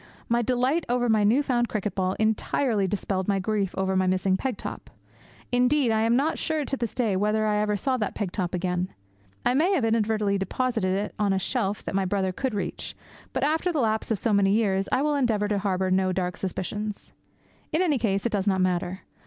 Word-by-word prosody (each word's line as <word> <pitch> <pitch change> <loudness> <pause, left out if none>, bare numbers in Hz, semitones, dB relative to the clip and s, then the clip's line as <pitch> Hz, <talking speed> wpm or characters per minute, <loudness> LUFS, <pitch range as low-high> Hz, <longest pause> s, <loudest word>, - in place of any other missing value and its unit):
My 235 +1 +2
delight 255 +7 +1
over 245 0 +1
my 215 -1 +4
new 235 +8 +4
found 240 -3 +1
cricket 210 -3 -2
ball 185 -1 0
entirely 220 0 +1
dispelled 190 -1 -2
my 200 -1 +2
grief 195 0 -1
over 190 0 0
my 185 0 +2
missing 185 +1 +2
peg 250 +2 -2
top. - - -7 0.6
Indeed, 250 +1 +3
I 220 0 +2
am 230 +1 +3
not 290 +5 +1
sure 310 -2 -1
to 275 - -2
this 235 -4 -4
day 225 -6 +1
whether 210 +3 +1
I 210 -1 +1
ever 210 0 +1
saw 260 +5 0
that 210 -4 -2
peg 200 -4 -2
top 180 -3 -2
again. 180 0 -1 0.5
I - - +3
may 330 +9 +3
have 275 -11 +2
inadvertently 215 -3 +1
deposited 220 -2 0
it 205 +1 -3
on 205 -2 +2
a - - +1
shelf 205 0 -1
that - - -5
my 195 0 +1
brother 190 0 0
could 255 +4 -2
reach; 205 - -4 0.4
but - - -2
after 320 +4 +1
the 325 - -2
lapse 220 -3 0
of 220 - +1
so 225 +2 0
many 200 -1 +4
years 195 -3 +1
I 265 - +2
will 300 0 +1
endeavour 230 -7 +1
to 205 -1 +1
harbour 190 -1 0
no 185 0 +2
dark 180 -1 -2
suspicions. 205 +3 -4 0.6
In 325 +3 +2
any 300 -7 +2
case, 200 -3 0
it 235 - +1
does 200 -1 -1
not 190 -2 +2
matter. 185 0 0
210 Hz, 220 wpm, -26 LUFS, 190-245 Hz, 0.6 s, my